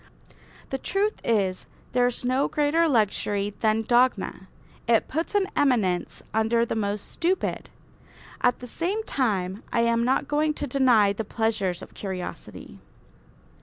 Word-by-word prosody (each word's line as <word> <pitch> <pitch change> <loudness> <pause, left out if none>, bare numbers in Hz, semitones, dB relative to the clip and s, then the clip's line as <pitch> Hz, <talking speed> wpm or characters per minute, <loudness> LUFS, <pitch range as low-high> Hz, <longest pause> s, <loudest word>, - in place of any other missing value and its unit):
The 270 - -2
truth 405 +7 -1
is, 195 -5 0 0.2
there 245 0 +3
is 245 0 -2
no 255 +3 +2
greater 305 +3 +2
luxury 205 -5 +1
than 220 0 +2
dogma. 240 -5 +1 0.4
It 230 -1 +3
puts 325 +7 -3
an 405 -2 +3
eminence 215 -11 +1
under 225 +2 +2
the - - -3
most 205 -1 -2
stupid. 355 +2 -1 0.7
At 245 0 +2
the 250 - -7
same 370 - -2
time 200 - -1
I 235 - +2
am 235 0 +2
not 265 +3 +1
going 300 +1 +1
to 290 - -3
deny 245 -8 +4
the 220 - -4
pleasures 215 -5 -1
of - - -12
curiosity. 185 - -7
235 Hz, 140 wpm, -25 LUFS, 205-280 Hz, 0.7 s, deny